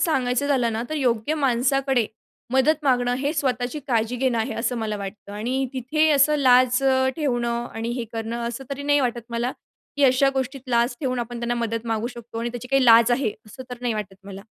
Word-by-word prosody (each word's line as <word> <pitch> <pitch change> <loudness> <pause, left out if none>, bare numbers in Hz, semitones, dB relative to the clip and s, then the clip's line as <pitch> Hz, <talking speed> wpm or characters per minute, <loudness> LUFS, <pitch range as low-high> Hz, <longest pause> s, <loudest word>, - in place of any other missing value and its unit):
सांगायचं 270 -4 +1
झालं 245 -5 +2
ना, 225 - -2
तर 310 - -3
योग्य 250 +1 0
माणसाकडे 265 -2 +1 0.5
मदत 300 +4 +3
मागणं 245 -2 +2
हे 285 +2 -1
स्वतःची 255 -2 -1
काळजी 230 0 0
घेणं 250 -2 +1
आहे, 225 0 -2
असं 235 +2 -1
मला 215 -2 -2
वाटतं. 200 +1 -8
आणि 250 +6 -2
तिथे 300 +5 +1
असं 295 +1 +4
लाज 255 -2 +4 0.4
ठेवणं 240 -5 -1
आणि 225 +1 -3
हे 235 - -2
करणं, 225 +1 -4
असं 240 +3 -6
तरी 275 +1 -4
नाही 290 0 +3
वाटत 240 -3 -1
मला, 235 +2 -1 0.4
की 285 - +3
अशा 260 +1 +4
गोष्टीत 265 0 -2
लाज 240 +1 +2
ठेवून 255 -3 -1
आपण 240 0 -5
त्यांना 240 0 -1
मदत 230 +1 -4
मागू 225 0 -1
शकतो 235 -1 -8
आणि 235 - -2
त्याची 245 +1 -8
काही 270 -1 +3
लाज 230 0 +7
आहे, 240 -3 +1 0.2
असं 260 +5 -10
तर 245 - -5
नाही 245 -2 -1
वाटत 210 -3 -5
मला. 195 0 -9
245 Hz, 200 wpm, -23 LUFS, 230-270 Hz, 0.5 s, लाज